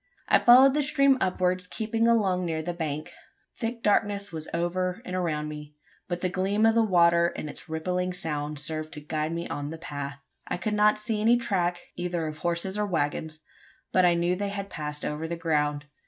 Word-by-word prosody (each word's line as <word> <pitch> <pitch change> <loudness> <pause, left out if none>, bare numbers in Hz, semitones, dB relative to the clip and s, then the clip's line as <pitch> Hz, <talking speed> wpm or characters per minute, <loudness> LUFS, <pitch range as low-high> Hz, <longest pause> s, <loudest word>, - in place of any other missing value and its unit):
I - - +5
followed 260 +3 +7
the 300 - +2
stream 275 -1 +4
upwards, 185 0 0
keeping 225 +3 0
along 195 -6 +2
near 160 -2 -2
the 175 +2 -3
bank. 155 -3 -4 0.4
Thick 230 0 -4
darkness 200 -1 +2
was 160 -1 -6
over 180 +2 -1
and 185 - -4
around 155 -4 -1
me; 150 0 -8 0.3
but 175 0 -3
the 185 - +1
gleam 195 +4 +1
of 225 - +5
the 230 - +4
water 170 -4 +4
and - - -5
its 155 - -10
rippling 180 +3 -1
sound 150 -4 -3
served 155 +1 -3
to - - -6
guide 155 +1 -3
me 170 0 -3
on 145 0 -4
the 160 - -6
path. 145 -3 -6 0.3
I - - -2
could 210 +4 -2
not 210 0 +4
see 210 0 -2
any 230 +3 +5
track 180 -6 -1
either 175 -2 -2
of 155 0 -6
horses 175 +4 -1
or 210 - +1
waggons 155 -2 -2 0.5
but 185 - +4
I 175 -1 +5
knew 175 +1 +1
they 200 +2 -2
had 200 0 -5
passed 150 -1 -4
over 150 +2 -3
the 170 - -3
ground. 150 -3 0
175 Hz, 200 wpm, -27 LUFS, 155-200 Hz, 0.5 s, followed